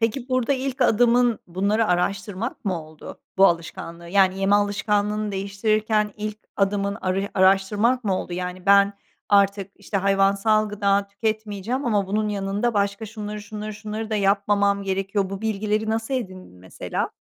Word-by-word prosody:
Peki, 240 +3 -1
burada 255 +1 +1
ilk 265 -1 -3
adımın 240 0 +3
bunları 200 +5 0
araştırmak 195 +6 -2
mı 180 -5 -1
oldu? 155 -1 -12 0.2
Bu 195 0 +7
alışkanlığı 170 0 -3
yani 190 0 +3
yeme 195 +1 +3
alışkanlığını 205 +1 0
değiştirirken 210 +2 0
ilk 215 0 -5 0.2
adımın 200 0 0
arıya 195 +2 -1
araştırmak 205 +6 +3
mı 190 -2 +1
oldu? - - -6
Yani 180 +1 -5
"Ben 200 0 +6 0.4
artık, 200 -1 +3
işte, 205 0 -4
hayvansal 200 +2 +2
gıda 200 -1 +1
tüketmeyeceğim 220 +4 -3
ama 205 -4 +1
bunun 210 +2 0
yanında 205 +3 -1
başka 200 +2 -1
şunları, 210 -1 -6
şunları, 210 0 -6
şunları 215 +1 -6
da 215 - 0
yapmamam 200 0 +2
gerekiyor." 195 0 -1
Bu 195 +1 -5
bilgileri 215 0 -1
nasıl 225 +4 -2
edindin 185 - -6
mesela? 95 +1 -4
205 Hz, 145 wpm, -23 LUFS, 195-215 Hz, 0.4 s, Bu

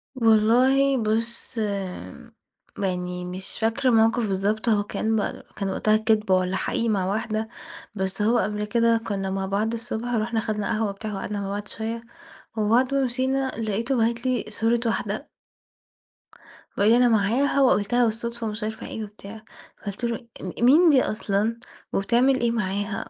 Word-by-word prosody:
والله 255 +4 +4
بُص 230 +2 -2
آمم 195 - -5 0.4
يعني 180 -2 -2
مش 185 +2 -5
فاكرة 230 +4 +1
مَوقِف 225 0 +3
بالضبط، 205 +4 0
هو 205 -2 +3
كان 220 +2 -1
ب 210 - -2
كان 195 -1 -2
وقتها 215 +2 +2
كدبة 215 -3 +2
والَّا 185 0 0
حقيقي 230 +4 -1
مع 195 -4 +1
واحدة، 220 +2 -2 0.5
بس 190 0 -2
هو 230 +3 +3
قبل 210 -1 -1
كده 230 +1 +3
كُنا 195 -2 -2
مع 195 0 -2
بعض 210 +4 -1
الصُبح، 235 +1 -3
ورُحنا 225 0 0
خدنا 215 -2 -2
قهوة 220 -1 0
وبتاع 210 +2 -6
وقعدنا 200 +1 -4
مع 195 - -4
بعض 205 +1 -4
شوية، 230 +1 -4 0.5
وبعد 235 +5 +2
ما 275 -1 +2
مشينا 260 +2 0
لقيته 230 +4 -1
باعت 235 +2 0
لي 255 -2 0
صورة 225 +2 +1
واحدة 225 - -2 1.5
وقال 205 +2 +4
لي 235 - +6
أنا 250 - +5
معاها، 235 +6 +2
وقابلتها 240 0 +3
بالصُدفة، 235 +1 -3
ومش 210 +1 -4
عارفة 220 +1 -5
إيه 220 - -5
وبتاع. 210 +1 -11 0.3
فقُلت 205 +3 -7
له 235 0 -3
أ 185 +4 -6
مين 310 +8 +7
دي 275 -4 +5
أصلًا؟ 215 +1 -1 0.3
وبتعمل 245 +6 +3
إيه 235 - +2
معاها؟ 205 -1 -2
220 Hz, 160 wpm, -24 LUFS, 205-235 Hz, 1.5 s, مين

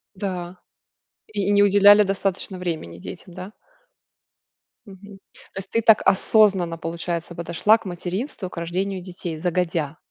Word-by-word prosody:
Да, 180 -2 -5 0.7
и 200 -2 -2
и - - +2
не 205 0 +4
уделяли 205 +1 +7
достаточно 195 -1 -2
времени 160 - -5
детям, 175 - -10
да? 185 +3 -8 1.3
Мгм. 200 0 -13 0.4
То - - -5
есть 195 0 -6
ты 230 - +1
так 220 -1 +5
осознанно, 190 -4 +3
получается, 170 +1 -4
подошла 170 +6 +2
к - - -18
материнству, 185 - -5
к - - -12
рождению 185 +3 -3
детей, 175 -3 -7
загодя. 170 -3 -1
185 Hz, 135 wpm, -23 LUFS, 170-200 Hz, 1.3 s, уделяли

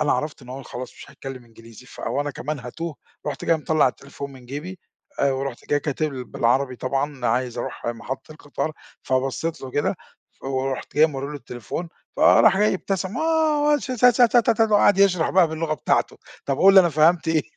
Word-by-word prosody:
أنا 150 - +2
عرفت 150 -2 -3
إن 125 - -14
هو 135 +2 -7
خلاص 125 -1 -8
مش - - -13
هيتكلم 135 -2 -9
إنجليزي، 115 +1 -15
فوأنا 145 +2 -3
كمان 145 +2 -5
هاتوه، 145 +6 -6 0.3
رُحت 145 -2 -4
جاي 165 - +3
مطلَّع 155 -2 +2
التليفون 140 +2 -9
من 130 -2 -14
جيبي، 155 +8 -7 0.4
آآ 140 -1 +3
ورُحت 135 -2 -4
جاي 145 0 +2
كاتب 150 +1 -2
ل 130 -1 -5
بالعربي 125 +2 0
طبعًا 135 0 -2
عايز 125 +1 -1
أروح - - -5
محطة 120 +5 -5
القطار، 155 +1 -4 0.3
فبصّيت 135 +5 -1
له 130 - -6
كده، 145 - 0 0.4
ف - - -18
ورُحت 135 0 -3
جاي 155 +1 +7
مورّي 140 -3 -5
له 150 - -7
التليفون، 140 +5 -6 0.3
فراح 220 - +6
جاي 210 -1 +3
ابتسم 190 +2 -3
آه 315 -2 +2
والش 295 -2 +2
ت 255 -2 -2
ت 245 0 +5
ت 235 0 +4
ت 220 - +2
وقعد 205 -1 +5
يشرح 180 -4 +3
بقى 180 -3 +4
باللغة 160 0 -2
بتاعته، 135 - 0 0.3
َطب 135 - 0
قُل 195 +1 +6
لي 190 - +10
أنا 175 - +3
فهمت 160 +2 +3
إيه؟ 160 -2 +2
145 Hz, 195 wpm, -23 LUFS, 130-180 Hz, 0.4 s, لي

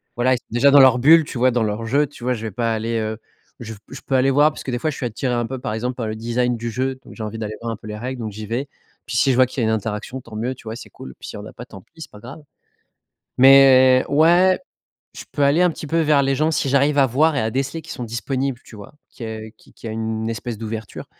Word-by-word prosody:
voilà, 130 +2 +2
ils - - -3
sont - - -17
déjà 125 +5 +4
dans 145 - +7
leur 130 -2 +7
bulle, 160 +4 +6
tu 140 - -7
vois, 130 +1 +3
dans 120 -1 0
leur 110 +1 -3
jeu, 140 +6 +1
tu 130 -4 -14
vois, 125 - +1
je 115 -2 -6
vais 110 - -4
pas 115 +3 -1
aller, 115 +1 -2
heu 110 0 -3 0.4
je 115 -1 -7 0.2
je 135 - -9
peux 135 - -1
aller 130 +1 +3
voir 145 +3 +4
parce - - -10
que, 130 - -4
des 120 - -2
fois, 155 - -1
je 145 - -5
suis 130 - -4
attiré 125 +2 -2
un 120 -1 0
peu, 130 +2 -6
par 120 -4 -4
exemple, 125 +3 -3
par 115 -3 -4
le 110 - -4
design 120 +2 -1
du 115 0 -5
jeu. 130 +3 -2
Donc - - -13
j'ai 110 - -7
envie 110 +1 -5
d'aller 110 -1 -5
voir 115 - -3
un - - -5
peu 110 0 -13
les 105 - -6
règles, 125 +2 -5
donc 110 -2 -4
j'y 105 +2 -8
vais. 120 +6 -3 0.4
Puis, 120 0 -3
si 135 0 +3
je - - +1
vois 130 +1 +5
qu'il 125 0 -5
y - - +1
a - - +1
une 110 - +2
interaction, 110 +4 -5
tant 115 -2 -12
mieux. 125 +4 -3
Tu - - -17
vois? 110 0 -6
C'est - - -11
cool. 65 - -11
Puis - - -10
s'il - - -8
y - - -7
en - - -10
a - - -10
pas, 120 - -10
tant 95 -6 -13
pis, 165 - -25
c'est - - -9
pas 105 - -13
grave. 135 +7 -10 1.0
Mais 130 -1 +7
ouais, 175 +5 +4 0.6
je - - -10
peux 145 - 0
aller 145 +5 +3
un 180 - +4
petit 155 - -8
peu 165 +2 0
vers 150 -3 +3
les 135 0 +1
gens 155 +3 +1
si 140 -3 -1
j'arrive 140 +2 +2
à 135 - +6
voir 150 +6 +2
et 140 - +1
à 110 0 -1
déceler 135 +5 -3
qu'ils - - -11
sont 125 - -6
disponibles, 130 +2 -3
tu - - -14
vois? 100 +7 -12 0.2
Qu'il 115 - -8
y - - -5
a, 110 0 -7
qu 110 - -23
qu'il 115 - -10
y - - -4
a - - -4
une 110 0 -3
espèce 115 0 -5
d'ouverture. 110 -1 -7
125 Hz, 315 wpm, -21 LUFS, 110-135 Hz, 1.0 s, dans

